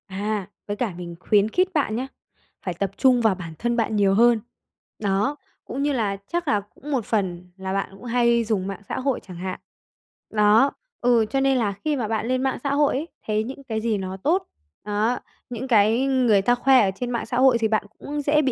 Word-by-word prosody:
À, 200 Hz, 0 st, -3 dB, 0.2 s
với 205 Hz, 0 st, -3 dB
cả 225 Hz, -5 st, -1 dB
mình 170 Hz, -1 st, -7 dB
khuyến 210 Hz, +2 st, +3 dB
khít 365 Hz, +10 st, +2 dB
bạn 280 Hz, -9 st, +1 dB
nhá, 255 Hz, +3 st, -2 dB, 0.6 s
phải 180 Hz, -, -1 dB
tập 190 Hz, +2 st, -2 dB
trung 255 Hz, -3 st, +4 dB
vào 220 Hz, -4 st, +3 dB
bản 170 Hz, -3 st, -8 dB
thân 240 Hz, 0 st, 0 dB
bạn 220 Hz, -1 st, 0 dB
nhiều 200 Hz, -2 st, +3 dB
hơn. 235 Hz, +2 st, +5 dB, 0.6 s
Đó, 205 Hz, +7 st, 0 dB, 0.3 s
cũng 275 Hz, +3 st, -3 dB
như 290 Hz, 0 st, +1 dB
là 210 Hz, -6 st, 0 dB
chắc 345 Hz, -1 st, -2 dB
là 210 Hz, -6 st, +2 dB
cũng 235 Hz, +8 st, -11 dB
một 255 Hz, -6 st, 0 dB
phần 180 Hz, -4 st, -2 dB
là 190 Hz, 0 st, -4 dB
bạn 195 Hz, 0 st, -1 dB
cũng 195 Hz, -, -14 dB
hay 235 Hz, -1 st, +3 dB
dùng 210 Hz, -4 st, -1 dB
mạng 195 Hz, 0 st, -6 dB
xã -, -, -2 dB
hội 265 Hz, 0 st, 0 dB
chẳng 180 Hz, -3 st, -11 dB
hạn, 185 Hz, +1 st, -4 dB, 0.7 s
đó, 220 Hz, +5 st, +4 dB, 0.3 s
ừ, 240 Hz, -2 st, +4 dB
cho 270 Hz, -, 0 dB
nên 270 Hz, -1 st, +3 dB
là 220 Hz, -5 st, +1 dB
khi 305 Hz, -1 st, +2 dB
mà 240 Hz, -5 st, -2 dB
bạn 220 Hz, +1 st, -1 dB
lên 255 Hz, +1 st, 0 dB
mạng 265 Hz, -, 0 dB
xã 280 Hz, -1 st, 0 dB
hội 290 Hz, 0 st, +3 dB
ấy, 295 Hz, +5 st, -2 dB, 0.2 s
thấy 215 Hz, 0 st, +1 dB
những 265 Hz, +4 st, -8 dB
cái 220 Hz, -4 st, -3 dB
gì 220 Hz, -2 st, 0 dB
nó 190 Hz, -1 st, -5 dB
tốt, 330 Hz, -, 0 dB, 0.4 s
đó, 210 Hz, +4 st, 0 dB, 0.3 s
những 245 Hz, +2 st, -5 dB
cái 225 Hz, +2 st, +4 dB
người 250 Hz, -7 st, +3 dB
ta 245 Hz, +5 st, +3 dB
khoe 260 Hz, +1 st, +5 dB
ở -, -, 0 dB
trên 245 Hz, +4 st, -4 dB
mạng 235 Hz, -, -2 dB
xã 245 Hz, -, -3 dB
hội 260 Hz, -1 st, +5 dB
thì 225 Hz, -1 st, +1 dB
bạn 215 Hz, -1 st, 0 dB
cũng 295 Hz, +1 st, -4 dB
dễ 295 Hz, +1 st, +3 dB
bị 270 Hz, -3 st, +1 dB
230 Hz, 230 wpm, -24 LUFS, 200-260 Hz, 0.7 s, hơn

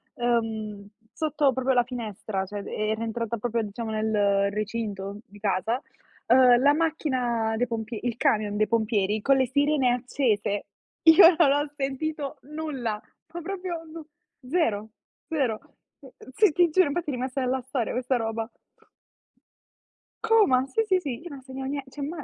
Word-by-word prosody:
uhm, 220 Hz, -4 st, -2 dB, 0.3 s
sotto 300 Hz, -4 st, +1 dB
proprio 260 Hz, 0 st, 0 dB
la 245 Hz, -, +5 dB
finestra, 215 Hz, -5 st, -4 dB
cioè 200 Hz, +1 st, -6 dB
e 215 Hz, 0 st, -2 dB
era 220 Hz, +1 st, -1 dB
entrata 230 Hz, 0 st, -3 dB
proprio 230 Hz, +1 st, -1 dB
diciamo 220 Hz, +2 st, -5 dB
nel 205 Hz, -2 st, +1 dB
recinto 210 Hz, -2 st, -4 dB
di 205 Hz, +1 st, -16 dB
casa, 210 Hz, +5 st, 0 dB, 0.5 s
uhm, 245 Hz, 0 st, +6 dB
la 285 Hz, +1 st, +5 dB
macchina 255 Hz, -8 st, 0 dB
dei 245 Hz, +2 st, +1 dB
pompie 225 Hz, -1 st, -4 dB
il 240 Hz, -2 st, -2 dB
camion 210 Hz, -1 st, +1 dB
dei 215 Hz, 0 st, +2 dB
pompieri 215 Hz, -2 st, +1 dB
con 275 Hz, +2 st, +4 dB
le 260 Hz, -1 st, +2 dB
sirene 280 Hz, -1 st, +2 dB
accese. 230 Hz, -5 st, -1 dB, 0.4 s
Io 330 Hz, +1 st, +9 dB
non 295 Hz, -6 st, +5 dB
ho 290 Hz, 0 st, 0 dB
sentito 280 Hz, +1 st, -3 dB
nulla, 275 Hz, -7 st, -4 dB, 0.3 s
ma 345 Hz, -, -5 dB
proprio 365 Hz, 0 st, -4 dB, 0.2 s
nu 325 Hz, -2 st, -9 dB, 0.4 s
zero, 220 Hz, -, 0 dB, 0.4 s
zero. 265 Hz, -9 st, 0 dB, 0.4 s
Eh, 270 Hz, -3 st, -15 dB, 0.2 s
sì, 415 Hz, 0 st, +4 dB
ti 345 Hz, +2 st, +3 dB
giuro, 370 Hz, 0 st, +4 dB
infatti, 310 Hz, +2 st, -2 dB
è -, -, -1 dB
rimasta 255 Hz, +2 st, -3 dB
nella 255 Hz, +1 st, 0 dB
storia 255 Hz, -2 st, -3 dB
questa 250 Hz, +1 st, 0 dB
roba. 225 Hz, 0 st, -3 dB, 1.7 s
Coma. 415 Hz, -, +4 dB
Sì, 450 Hz, +11 st, 0 dB
sì, 375 Hz, -3 st, +3 dB
sì, 265 Hz, -8 st, -5 dB
io 345 Hz, -, -9 dB
non 280 Hz, -3 st, -9 dB
ho -, -, -15 dB
sentito 265 Hz, 0 st, -7 dB
nie 280 Hz, 0 st, -3 dB
Cioè 280 Hz, +1 st, -6 dB
ma, 320 Hz, +3 st, -5 dB
250 Hz, 160 wpm, -26 LUFS, 220-285 Hz, 1.7 s, Io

